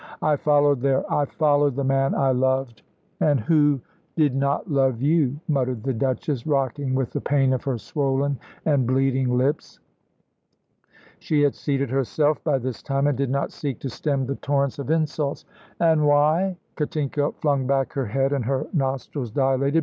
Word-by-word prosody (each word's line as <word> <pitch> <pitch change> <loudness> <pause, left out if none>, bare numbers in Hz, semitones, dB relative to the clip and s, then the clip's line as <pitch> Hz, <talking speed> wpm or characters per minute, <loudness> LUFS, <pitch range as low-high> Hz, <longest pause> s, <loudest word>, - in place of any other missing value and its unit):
I 155 -1 +3
followed 145 -2 +2
there; 135 0 +2
I 145 - +2
followed 145 -2 +2
the 140 - -1
man 135 0 +1
I 135 -1 +2
loved 130 -3 0 0.2
" - - -41
"And 145 -3 +3
who 145 +3 +3 0.4
did 150 -4 +3
not 140 +1 0
love 135 -5 +1
you," 145 -1 +1
muttered 130 -6 -1
the 135 0 -1
Duchess, 130 +2 -2
rocking 135 -2 0
with 130 -2 -1
the - - -3
pain 135 -2 +2
of 130 - -2
her 135 -3 -1
swollen 140 +2 -1 0.3
and 140 -6 +2
bleeding 130 -1 +1
lips. 135 +4 -1 1.4
She 150 -2 +1
had 145 - +3
seated 140 -3 -2
herself 145 +3 0
by 150 -4 +1
this 130 -2 -5
time, 135 0 -1
and 145 -1 +2
did 135 0 -1
not 140 +1 -1
seek 140 -3 -4
to 135 - -4
stem 140 +1 -1
the 140 +2 -4
torrents 140 -1 -1
of 140 - -5
insults. 155 -3 -1 0.3
"And 160 -3 +3
why?" 155 +6 +3 0.2
Katinka 145 -1 -1
flung 140 -4 0
back 135 -2 0
her 135 -4 -2
head 135 +6 0
and 135 -3 -1
her 135 +1 -1
nostrils 135 -3 -2
dilated. 135 +5 +1
140 Hz, 175 wpm, -23 LUFS, 130-145 Hz, 1.4 s, I